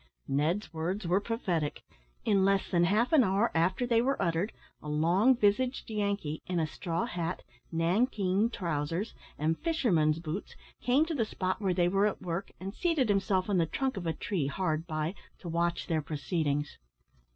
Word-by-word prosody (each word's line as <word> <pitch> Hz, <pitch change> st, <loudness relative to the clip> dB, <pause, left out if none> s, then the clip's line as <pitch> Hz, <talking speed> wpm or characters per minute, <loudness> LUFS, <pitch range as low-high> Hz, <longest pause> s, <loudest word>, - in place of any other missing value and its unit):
Ned's 160 Hz, +9 st, 0 dB
words 175 Hz, +5 st, -2 dB
were 180 Hz, +3 st, +3 dB
prophetic. 185 Hz, -, -2 dB, 0.4 s
In 200 Hz, -3 st, +3 dB
less 195 Hz, 0 st, +2 dB
than 175 Hz, -1 st, +4 dB
half 215 Hz, -, +2 dB
an 295 Hz, -5 st, +7 dB
hour 200 Hz, +3 st, +2 dB
after 185 Hz, +8 st, +2 dB
they 230 Hz, -1 st, +3 dB
were 270 Hz, +3 st, 0 dB
uttered 170 Hz, +4 st, 0 dB, 0.3 s
a 150 Hz, -, -7 dB
long 175 Hz, -, +4 dB
visaged 235 Hz, +4 st, +1 dB
Yankee, 200 Hz, -7 st, -1 dB
in 180 Hz, -1 st, 0 dB
a 160 Hz, -, +2 dB
straw 165 Hz, +2 st, -2 dB
hat, 175 Hz, 0 st, -3 dB, 0.3 s
nankeen 190 Hz, +4 st, +2 dB
trousers, 165 Hz, 0 st, -2 dB, 0.2 s
and 160 Hz, +2 st, 0 dB
fisherman's 185 Hz, -, +2 dB
boots, 165 Hz, +4 st, -5 dB, 0.3 s
came 265 Hz, +5 st, +3 dB
to 330 Hz, -, -3 dB
the 260 Hz, -7 st, +1 dB
spot 185 Hz, -2 st, -2 dB
where 190 Hz, -3 st, +1 dB
they 175 Hz, -1 st, +3 dB
were 195 Hz, +3 st, +3 dB
at 210 Hz, -, -3 dB
work, 180 Hz, +1 st, -3 dB
and 195 Hz, +1 st, -5 dB
seated 315 Hz, -5 st, +1 dB
himself 195 Hz, -2 st, +2 dB
on 200 Hz, -3 st, +2 dB
the 165 Hz, -, +2 dB
trunk 265 Hz, -, -1 dB
of 180 Hz, -4 st, -4 dB
a 165 Hz, -, +1 dB
tree 165 Hz, -7 st, -2 dB
hard 160 Hz, +1 st, -1 dB
by 155 Hz, +1 st, -2 dB, 0.2 s
to 180 Hz, -, -10 dB
watch 170 Hz, +1 st, 0 dB
their 160 Hz, -2 st, 0 dB
proceedings. 145 Hz, -1 st, -2 dB
185 Hz, 175 wpm, -30 LUFS, 165-210 Hz, 0.4 s, an